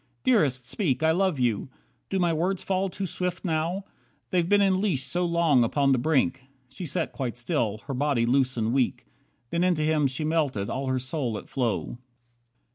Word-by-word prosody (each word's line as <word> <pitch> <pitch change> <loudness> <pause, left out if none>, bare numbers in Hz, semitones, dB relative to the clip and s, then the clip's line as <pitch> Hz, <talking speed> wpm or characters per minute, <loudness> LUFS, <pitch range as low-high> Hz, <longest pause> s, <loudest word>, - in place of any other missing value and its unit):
Dearest, 140 - +2
speak, 150 - 0
I 160 - +5
love 185 -1 +1
you. 120 0 0 0.4
Do 195 - 0
my 175 -2 +2
words 175 +4 -1
fall 190 0 0
too 195 +2 -4
swift 180 +1 -3
now? 170 +4 -1 0.5
They've 175 -2 +1
been 205 0 +5
in 190 -2 +3
leash 170 -11 +1
so 175 +8 0
long 170 -7 +3
upon 140 +4 +2
the 130 - +3
brink." 135 -2 +1 0.3
She 180 - -6
sat 165 +3 -2
quite 125 -4 -4
still, 110 -3 -1
her 140 - -4
body 135 -3 +1
loose 130 +1 +2
and 115 +1 0
weak. 130 -2 0 0.5
Then 170 +1 +1
into 175 -4 +2
him 155 -2 +2
she 130 +3 -4
melted, 150 -10 0
all 135 +1 -3
her 130 0 +1
soul 130 -3 -2
at - - -9
flow. 120 -1 -2
150 Hz, 190 wpm, -26 LUFS, 130-180 Hz, 0.5 s, I